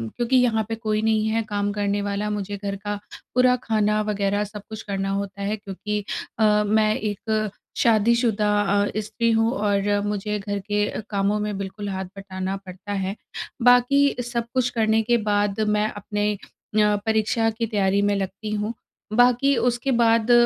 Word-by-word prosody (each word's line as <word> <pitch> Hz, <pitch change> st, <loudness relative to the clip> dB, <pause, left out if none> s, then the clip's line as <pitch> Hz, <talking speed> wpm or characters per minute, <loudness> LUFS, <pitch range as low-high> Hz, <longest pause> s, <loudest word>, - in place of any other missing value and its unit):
क्योंकि 240 Hz, +2 st, 0 dB
यहाँ 230 Hz, -3 st, +3 dB
पे 225 Hz, -, -1 dB
कोई 215 Hz, -1 st, -1 dB
नहीं 220 Hz, -1 st, +2 dB
है 225 Hz, +1 st, +1 dB
काम 205 Hz, 0 st, 0 dB
करने 205 Hz, 0 st, -1 dB
वाला। 205 Hz, +1 st, -2 dB
मुझे 205 Hz, -1 st, -3 dB
घर 200 Hz, 0 st, -4 dB
का 205 Hz, +1 st, -4 dB, 0.4 s
पूरा 250 Hz, 0 st, +5 dB
खाना 215 Hz, -1 st, +1 dB
वग़ैरह 205 Hz, -1 st, 0 dB
सब 210 Hz, 0 st, -8 dB
कुछ 220 Hz, 0 st, -6 dB
करना 195 Hz, -1 st, -2 dB
होता 200 Hz, 0 st, -3 dB
है, 205 Hz, +2 st, -1 dB
क्योंकि 205 Hz, +1 st, -4 dB, 0.4 s
अ, 210 Hz, -1 st, +4 dB
मैं 215 Hz, 0 st, +3 dB
एक 215 Hz, +1 st, -1 dB, 0.3 s
शादीशुदा 225 Hz, -1 st, +3 dB
अ, 205 Hz, 0 st, +1 dB
स्त्री 220 Hz, +2 st, -1 dB
हूँ 225 Hz, +1 st, +3 dB
और 205 Hz, -2 st, +1 dB
मुझे 210 Hz, 0 st, -2 dB
घर 205 Hz, 0 st, -3 dB
के 205 Hz, +1 st, 0 dB
अ, -, -, -4 dB
कामों 200 Hz, +1 st, +1 dB
में 210 Hz, -1 st, -2 dB
बिल्कुल 200 Hz, +1 st, -5 dB
हाथ 190 Hz, 0 st, -3 dB
बटाना 190 Hz, -1 st, -4 dB
पड़ता 185 Hz, +2 st, -8 dB
है। 195 Hz, 0 st, -2 dB, 0.5 s
बाकी 245 Hz, +3 st, +5 dB
सब 235 Hz, -1 st, -2 dB
कुछ 255 Hz, -2 st, +2 dB
करने 220 Hz, -2 st, +2 dB
के 240 Hz, +2 st, +3 dB
बाद 205 Hz, 0 st, +1 dB, 0.2 s
मैं 210 Hz, +1 st, +2 dB
अपने 205 Hz, 0 st, -2 dB
अ, -, -, -7 dB, 0.7 s
परीक्षा 220 Hz, +1 st, +2 dB
की 225 Hz, +1 st, -2 dB
तैयारी 200 Hz, -2 st, +1 dB
में 205 Hz, 0 st, +2 dB
लगती 195 Hz, +2 st, -4 dB
हूँ। 210 Hz, +1 st, -2 dB, 0.4 s
बाकी 245 Hz, +4 st, +4 dB
उसके 240 Hz, +3 st, +1 dB
बाद 230 Hz, 0 st, +3 dB
210 Hz, 170 wpm, -23 LUFS, 200-225 Hz, 0.7 s, पूरा